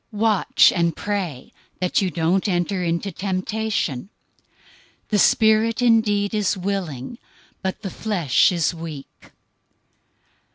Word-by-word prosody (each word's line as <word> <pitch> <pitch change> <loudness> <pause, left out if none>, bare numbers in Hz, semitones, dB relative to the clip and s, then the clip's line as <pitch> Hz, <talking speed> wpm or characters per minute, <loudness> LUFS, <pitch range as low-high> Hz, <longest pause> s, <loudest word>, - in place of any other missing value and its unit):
026:041 210 - -8
Watch 220 -3 +4
and 170 -2 +1
pray, 190 -10 -4 0.3
that 180 +2 +1
you 190 - 0
don't 170 +4 0
enter 180 0 -1
into 170 +3 -2
temptation. 190 - -2 1.0
The 210 - +2
spirit 220 +3 +3
indeed 215 -3 +2
is 210 -2 0
willing, 185 - -4 0.4
but 190 +3 -4
the 195 - -4
flesh 185 - +2
is 170 -2 0
weak." 160 -4 -10
190 Hz, 115 wpm, -22 LUFS, 170-210 Hz, 1.0 s, Watch